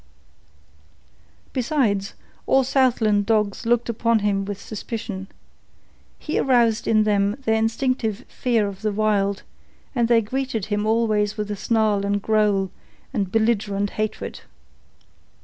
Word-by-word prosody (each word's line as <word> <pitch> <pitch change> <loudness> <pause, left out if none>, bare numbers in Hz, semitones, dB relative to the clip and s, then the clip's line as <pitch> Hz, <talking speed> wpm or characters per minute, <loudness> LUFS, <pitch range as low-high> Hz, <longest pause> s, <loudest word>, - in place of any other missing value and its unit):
Besides, 235 -7 0 0.3
all 265 0 +4
Southland 230 -6 +2
dogs 215 0 0
looked 240 0 +2
upon 230 0 +1
him 200 -2 0
with 200 0 -5
suspicion. 210 -2 -6 0.9
He 305 - -2
aroused 235 -4 +2
in 215 -1 +4
them 205 -1 +1
their 220 0 +3
instinctive 225 0 -1
fear 230 -5 0
of 195 -1 -8
the 215 -1 0
Wild, 200 -1 0 0.5
and 240 -3 +1
they 235 -1 +4
greeted 245 -2 -2
him 210 0 -1
always 215 -2 +1
with 210 -1 -3
snarl 215 -1 +1
and 200 0 0
growl 205 -3 +1 0.4
and 200 -6 -1
belligerent 205 -3 +1
hatred. 215 0 -4
215 Hz, 120 wpm, -23 LUFS, 205-230 Hz, 0.9 s, all